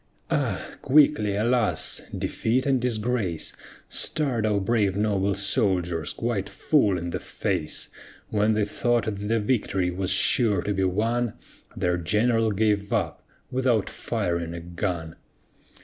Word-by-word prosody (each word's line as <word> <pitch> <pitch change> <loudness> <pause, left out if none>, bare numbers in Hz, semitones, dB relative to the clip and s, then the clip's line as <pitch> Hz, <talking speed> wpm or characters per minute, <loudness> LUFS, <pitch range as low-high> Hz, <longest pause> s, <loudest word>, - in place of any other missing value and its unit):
Ah! - - 0 0.2
quickly 135 -8 +4
alas! 115 +1 +1 0.2
defeat 125 +4 0
and 135 -3 +2
disgrace 110 -7 -1 0.3
Star'd 125 -8 +1
our 105 -1 +2
brave 100 -1 +1
noble 100 -2 +1
soldiers 90 - +1
quite 110 -4 -2
full 100 - +2
in 85 0 -4
the - - -3
face, 75 - -2 0.4
When 105 +1 +2
they 105 -1 +2
thought 120 +1 0
that 105 -1 -4
the 115 +1 +2
victory 100 -5 0
was 90 +1 -3
sure 100 0 +3
to 105 - -1
be 95 -1 +1
won, 115 +5 0 0.4
Their 90 0 +1
general 110 +6 +2
gave 105 -1 0
up, - - -1 0.3
without 125 -4 +1
firing 85 -1 -2
a - - -5
gun. 85 -1 -4
105 Hz, 135 wpm, -25 LUFS, 95-115 Hz, 0.4 s, quickly